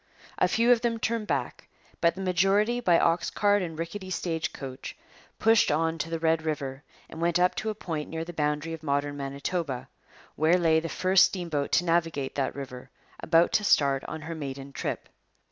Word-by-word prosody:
A -, -, +4 dB
few 230 Hz, +6 st, +3 dB
of 240 Hz, -2 st, +4 dB
them 235 Hz, -1 st, 0 dB
turned 225 Hz, -1 st, -2 dB
back, 140 Hz, -5 st, -3 dB, 0.3 s
but 170 Hz, 0 st, +3 dB
the 190 Hz, -, -6 dB
majority, 195 Hz, +6 st, +2 dB
by 180 Hz, -8 st, +4 dB
ox 165 Hz, +1 st, +2 dB
cart 205 Hz, 0 st, +2 dB
and 165 Hz, -3 st, -5 dB
rickety 185 Hz, +4 st, -5 dB
stagecoach, 160 Hz, -7 st, -4 dB, 0.4 s
pushed 225 Hz, -1 st, +4 dB
on 160 Hz, +2 st, 0 dB
to 165 Hz, -, -3 dB
the 165 Hz, -, -2 dB
Red 160 Hz, 0 st, +1 dB
River 140 Hz, -4 st, -3 dB, 0.3 s
and 160 Hz, -, -9 dB
went 170 Hz, 0 st, +2 dB
up 180 Hz, +1 st, +3 dB
to 220 Hz, -, -2 dB
a 215 Hz, -, -3 dB
point 160 Hz, -7 st, -5 dB
near 160 Hz, 0 st, -4 dB
the 175 Hz, -, -8 dB
boundary 150 Hz, +1 st, -1 dB
of 165 Hz, -, -7 dB
modern 145 Hz, -1 st, -1 dB
Manitoba, 140 Hz, 0 st, -4 dB, 0.5 s
where 160 Hz, +4 st, +3 dB
lay 165 Hz, -2 st, +3 dB
the 165 Hz, +1 st, -5 dB
first 185 Hz, +2 st, +4 dB
steamboat 165 Hz, -6 st, -3 dB
to 175 Hz, -, +3 dB
navigate 165 Hz, -5 st, 0 dB
that 135 Hz, -2 st, -2 dB
river, 130 Hz, -3 st, -8 dB, 0.3 s
about 165 Hz, +1 st, +3 dB
to 210 Hz, -, +2 dB
start 140 Hz, -8 st, +3 dB
on 160 Hz, -, -6 dB
her 165 Hz, +2 st, -6 dB
maiden 140 Hz, -3 st, -6 dB
trip. -, -, -4 dB
165 Hz, 190 wpm, -27 LUFS, 145-185 Hz, 0.5 s, A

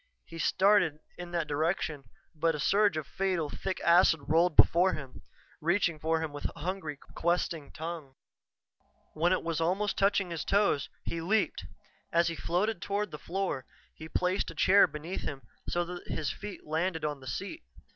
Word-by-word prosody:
He 165 Hz, -, -10 dB
started 190 Hz, -4 st, +3 dB, 0.2 s
in 175 Hz, -1 st, -7 dB
that 170 Hz, -2 st, -1 dB
direction, 150 Hz, -1 st, -1 dB, 0.3 s
but 165 Hz, 0 st, +1 dB
a -, -, -5 dB
surge 200 Hz, +3 st, +3 dB
of 155 Hz, -, -3 dB
fatal, 180 Hz, -5 st, -1 dB
thick 190 Hz, -1 st, -3 dB
acid 170 Hz, -2 st, +5 dB
rolled 165 Hz, +1 st, +3 dB
before 180 Hz, +3 st, +6 dB
him, 140 Hz, -4 st, -7 dB, 0.4 s
reaching 170 Hz, -1 st, +1 dB
for 160 Hz, +1 st, +1 dB
him 160 Hz, -2 st, -4 dB
with 145 Hz, -, -3 dB
hungry, 165 Hz, -3 st, -4 dB, 0.2 s
questing 170 Hz, -3 st, -1 dB
tongues. 160 Hz, -4 st, -6 dB, 1.0 s
When 170 Hz, +3 st, +2 dB
it 185 Hz, -, +1 dB
was 165 Hz, -1 st, -1 dB
almost 195 Hz, +5 st, 0 dB
touching 195 Hz, -2 st, +2 dB
his 165 Hz, -2 st, -3 dB
toes, 200 Hz, -9 st, +2 dB
he 165 Hz, -, -3 dB
leaped. 215 Hz, +6 st, 0 dB, 0.5 s
As 170 Hz, 0 st, +3 dB
he 165 Hz, -, -4 dB
floated 185 Hz, +4 st, -1 dB
toward 205 Hz, +1 st, -2 dB
the 150 Hz, -, -7 dB
floor, 175 Hz, -8 st, -3 dB, 0.3 s
he 160 Hz, 0 st, -10 dB
placed 180 Hz, +4 st, 0 dB
a -, -, -9 dB
chair 200 Hz, +2 st, +6 dB
beneath 160 Hz, +5 st, -5 dB
him 135 Hz, -1 st, -5 dB, 0.3 s
so 175 Hz, 0 st, 0 dB
that 175 Hz, 0 st, -8 dB
his 150 Hz, -3 st, -2 dB
feet 205 Hz, -1 st, -8 dB
landed 160 Hz, +1 st, -1 dB
on 145 Hz, -2 st, -2 dB
the 130 Hz, -, -12 dB
seat. 200 Hz, -, -4 dB
170 Hz, 170 wpm, -30 LUFS, 155-190 Hz, 1.0 s, before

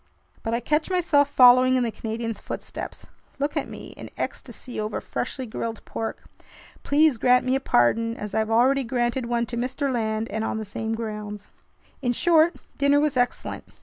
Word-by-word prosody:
But 225 Hz, +1 st, -1 dB
I -, -, 0 dB
catch 300 Hz, +7 st, 0 dB
myself 320 Hz, -6 st, +3 dB
following 255 Hz, -1 st, +7 dB
in 255 Hz, -, +2 dB
the 230 Hz, -, -1 dB
Canadian's 225 Hz, 0 st, -4 dB
footsteps. -, -, -7 dB, 0.3 s
Look 285 Hz, +1 st, -2 dB
at -, -, -2 dB
me—in -, -, -9 dB
ecstasy 250 Hz, -, -5 dB
over 215 Hz, 0 st, -2 dB
freshly 260 Hz, +1 st, -4 dB
grilled 225 Hz, 0 st, -5 dB
pork! 225 Hz, -, -5 dB, 0.6 s
Please 290 Hz, -4 st, +3 dB
grant 250 Hz, +1 st, +4 dB
me 255 Hz, -, +1 dB
a -, -, +1 dB
pardon 230 Hz, -, +2 dB
as 210 Hz, -1 st, -6 dB
I've 220 Hz, 0 st, 0 dB
already 260 Hz, +4 st, +3 dB
granted 240 Hz, 0 st, -1 dB
one 235 Hz, 0 st, 0 dB
to 235 Hz, +1 st, -5 dB
Mr. 265 Hz, +3 st, -1 dB
Land, 220 Hz, -1 st, -1 dB
and 220 Hz, +1 st, -2 dB
on 220 Hz, -, -2 dB
the 220 Hz, -, -4 dB
same 220 Hz, +2 st, -3 dB
grounds! 210 Hz, -2 st, -6 dB, 0.5 s
In 245 Hz, -2 st, +1 dB
short, 335 Hz, +4 st, +4 dB, 0.2 s
dinner 280 Hz, 0 st, +4 dB
was 295 Hz, -1 st, +1 dB
excellent. 245 Hz, -1 st, -1 dB
240 Hz, 175 wpm, -25 LUFS, 225-275 Hz, 0.6 s, following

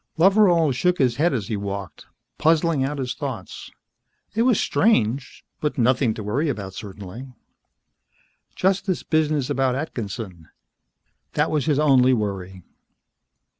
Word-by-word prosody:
Loveral 175 Hz, -4 st, +5 dB
shook 180 Hz, +8 st, +1 dB
his 125 Hz, -3 st, +1 dB
head 165 Hz, +4 st, +3 dB
as 115 Hz, -8 st, -2 dB
he 110 Hz, -, -2 dB
walked, 100 Hz, -5 st, -6 dB, 0.3 s
puzzling 160 Hz, -2 st, +2 dB
out 145 Hz, +2 st, -2 dB
his 130 Hz, -2 st, -3 dB
thoughts. 130 Hz, -2 st, -6 dB, 0.6 s
It 225 Hz, -, 0 dB
was 240 Hz, -3 st, +3 dB
strange, 130 Hz, -, +1 dB
but 150 Hz, -1 st, -2 dB
nothing 125 Hz, -2 st, +2 dB
to 110 Hz, -, -6 dB
worry 135 Hz, +10 st, 0 dB
about 100 Hz, -7 st, -4 dB
certainly. 105 Hz, +6 st, -9 dB, 1.2 s
Just 195 Hz, +2 st, +1 dB
this 185 Hz, -, -1 dB
business 155 Hz, -4 st, +1 dB
about 135 Hz, -2 st, +1 dB
Atkinson. 105 Hz, -, -6 dB, 0.8 s
That -, -, +1 dB
was 155 Hz, -1 st, 0 dB
his 150 Hz, -3 st, +2 dB
only 130 Hz, -4 st, +4 dB
worry. 95 Hz, -5 st, -3 dB
130 Hz, 130 wpm, -23 LUFS, 105-155 Hz, 1.2 s, Loveral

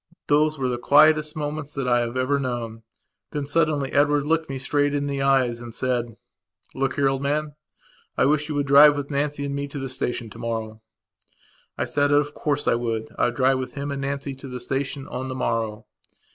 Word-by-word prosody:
Those 150 Hz, +1 st, +2 dB
were 130 Hz, -2 st, -1 dB
the 120 Hz, -1 st, -2 dB
quietest 155 Hz, +3 st, +4 dB
moments 150 Hz, -1 st, -4 dB
that 135 Hz, -2 st, -2 dB
I 120 Hz, -1 st, +3 dB
have 120 Hz, +1 st, -2 dB
ever 135 Hz, +2 st, +1 dB
known. 120 Hz, -4 st, -4 dB, 0.5 s
Then, 145 Hz, -2 st, -2 dB
suddenly, 145 Hz, -2 st, +1 dB
Edward 145 Hz, 0 st, +3 dB
looked 160 Hz, 0 st, 0 dB
me 135 Hz, -, -3 dB
straight 145 Hz, +2 st, 0 dB
in 145 Hz, 0 st, -1 dB
the 140 Hz, -1 st, -2 dB
eyes 130 Hz, -4 st, +2 dB
and 120 Hz, -1 st, -9 dB
said: 120 Hz, -3 st, -1 dB, 0.6 s
"Look 135 Hz, 0 st, -1 dB
here, 140 Hz, -1 st, +2 dB
old 135 Hz, 0 st, 0 dB
man, 150 Hz, +1 st, -1 dB, 0.6 s
I -, -, +4 dB
wish 150 Hz, +2 st, +1 dB
you 150 Hz, -, -2 dB
would 145 Hz, -1 st, 0 dB
drive 145 Hz, +1 st, +7 dB
with 145 Hz, +1 st, -4 dB
Nancy 145 Hz, 0 st, -1 dB
and 140 Hz, -, -3 dB
me 140 Hz, 0 st, -3 dB
to 140 Hz, -, -8 dB
the 135 Hz, -1 st, -4 dB
station 120 Hz, -3 st, -3 dB
tomorrow." 110 Hz, -1 st, -5 dB, 1.0 s
I -, -, 0 dB
said 145 Hz, 0 st, +1 dB
that 145 Hz, -, +3 dB
of 145 Hz, 0 st, +1 dB
course 145 Hz, -1 st, -1 dB
I -, -, +4 dB
would 115 Hz, -2 st, -2 dB, 0.3 s
drive 130 Hz, 0 st, +3 dB
with 130 Hz, -1 st, -6 dB
him 140 Hz, 0 st, -4 dB
and 140 Hz, -1 st, -3 dB
Nancy 140 Hz, 0 st, -3 dB
to 135 Hz, -, -9 dB
the 125 Hz, -1 st, -6 dB
station 135 Hz, +2 st, -3 dB
on 130 Hz, +1 st, -5 dB
the 130 Hz, -, -5 dB
morrow. 115 Hz, -4 st, -2 dB
140 Hz, 205 wpm, -24 LUFS, 125-145 Hz, 1.0 s, drive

